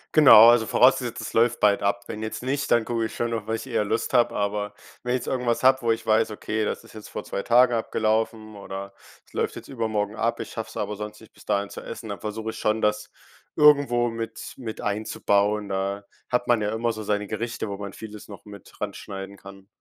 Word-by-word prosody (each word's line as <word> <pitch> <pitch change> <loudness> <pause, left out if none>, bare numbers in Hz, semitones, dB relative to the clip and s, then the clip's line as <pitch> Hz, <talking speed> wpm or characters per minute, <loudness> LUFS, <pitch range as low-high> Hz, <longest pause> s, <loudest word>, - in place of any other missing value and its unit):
Genau, 120 -7 +10
also 120 -1 +4
vorausgesetzt, 125 -2 +3
es - - -6
läuft 120 +1 +2
bald 100 -1 +4
ab. 100 0 0
Wenn 110 -1 -6
jetzt 110 +2 -5
nicht, 140 +2 -1
dann 120 -1 +4
gucke 115 0 -1
ich - - -6
schon 120 - -1
noch, 110 -2 -3
worauf 110 - 0
ich 115 - -7
eher 105 - 0
Lust 110 +3 -1
hab. 120 -1 +4
Aber 105 0 -2 0.3
wenn 125 0 -1
ich 125 - 0
jetzt - - -9
irgendwas 125 -2 0
habe, 130 0 +5
wo 115 - +2
ich 115 0 -7
weiß: 110 0 +3
„Okay, 110 +1 -2
das - - -3
ist - - -16
jetzt 110 -1 -10
vor - - -6
2 100 - -4
Tagen 125 +1 +5
abgelaufen 110 -1 -1
oder 100 0 -7 0.3
es - - -25
läuft - - -2
jetzt - - -10
übermorgen 110 -4 -2
ab, 115 - 0
ich - - -6
schaff's - - -6
aber 105 - -3
sonst 105 +1 -7
nicht 110 - -16
bis - - -19
dahin 100 0 0
zu - - -8
essen.“ 115 -1 -8
Dann 100 -3 -5
versuche 110 +2 -4
ich - - -6
schon, 110 +1 0
das 105 0 0 0.5
irgendwo 140 -5 +5
mit 115 0 -6
mit 115 -3 -6
einzubauen. 105 -1 0
Da 100 +1 -2 0.2
hat 125 0 0
man 120 -3 +3
ja 105 +1 -1
immer 115 +1 0
so 110 -1 -6
seine 105 -1 -1
Gerichte, 110 0 -4
wo 100 - -4
man 100 -1 -7
vieles 105 -2 -10
noch 100 - -11
mit 100 -1 -14
ranschneiden 100 -1 -6
kann. 95 0 -13
110 Hz, 230 wpm, -25 LUFS, 105-115 Hz, 0.5 s, Genau